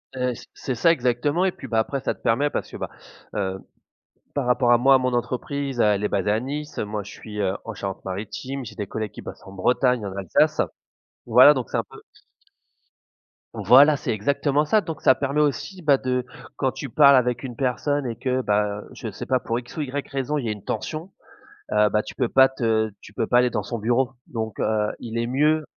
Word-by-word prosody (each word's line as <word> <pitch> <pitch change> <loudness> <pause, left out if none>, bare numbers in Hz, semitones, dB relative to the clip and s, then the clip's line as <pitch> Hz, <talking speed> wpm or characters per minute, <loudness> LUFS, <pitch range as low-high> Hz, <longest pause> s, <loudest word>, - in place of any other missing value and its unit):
Heu, 125 -1 -1
c - - -12
c'est 130 - -4
ça, 165 +8 +4
exactement 145 +5 +1
et 190 - +2
puis, - - -10
bah, 115 - +1
après 135 +5 -1
ça - - -1
te - - -24
permet 140 +6 +2
parce - - -4
que, - - -8
bah, - - -5 0.5
heu, 95 -2 -2 0.8
par 140 -3 -1
rapport 125 0 +3
à 120 - +6
moi 135 +3 +5
à - - +7
mon 130 0 -1
entreprise, 130 +2 -2
elle 105 -2 +3
est - - +2
basée 100 0 0
à 110 +2 +2
Nice, 145 +4 -5
moi, 105 0 -3
je - - -11
suis, 105 -1 -8
heu, 95 -1 0
en 115 - -6
Charente-Maritime, 100 +7 -5
j'ai 110 - -9
des 105 - -4
collègues 110 0 -4
qui - - -10
bossent - - -9
en 95 - -11
Bretagne, 125 +4 +1
en 95 - -6
Alsace. 95 -4 +2 0.7
Voilà 125 +5 +8
donc 130 -6 -3
c'est - - -1
un - - -1
peu - - -13 1.5
Voilà, 145 +1 +6
c'est - - -3
exactement 140 +6 +1
ça, 215 +8 +3
donc 165 -6 -6
ça - - +6
permet 140 +3 0
aussi, 150 +6 -1
bah, 145 -4 +4
de 125 -1 -1 0.3
quand 135 -2 0
tu 140 - -6
parles 140 +1 +6
avec 125 0 0
une 125 -3 -6
personne 135 +2 0
et 115 - -3
que, 130 +2 -1
bah, 105 -2 0
je - - -6
sais - - -7
pas 130 -1 +1
pour 115 +1 -2
X 120 - -13
ou 155 - -2
Y 140 0 -4
raison 135 +2 -2
il 135 - -3
y - - -1
a - - 0
une 105 -2 -12
tension, 160 - -4 0.6
heu, 105 0 +4
bah, 105 +2 +1
tu - - -9
peux 125 -3 -1
pas 135 0 +6
te 110 -4 0
tu - - -13
peux 110 - -1
pas 120 - +4
aller 125 0 +3
dans - - -2
son 120 - -5
bureau, 120 +4 +1
donc, 110 -3 -5
heu, 105 -1 +1
il 115 0 -5
est 115 - 0
mieux, 150 +5 +2
125 Hz, 230 wpm, -24 LUFS, 110-140 Hz, 1.5 s, Voilà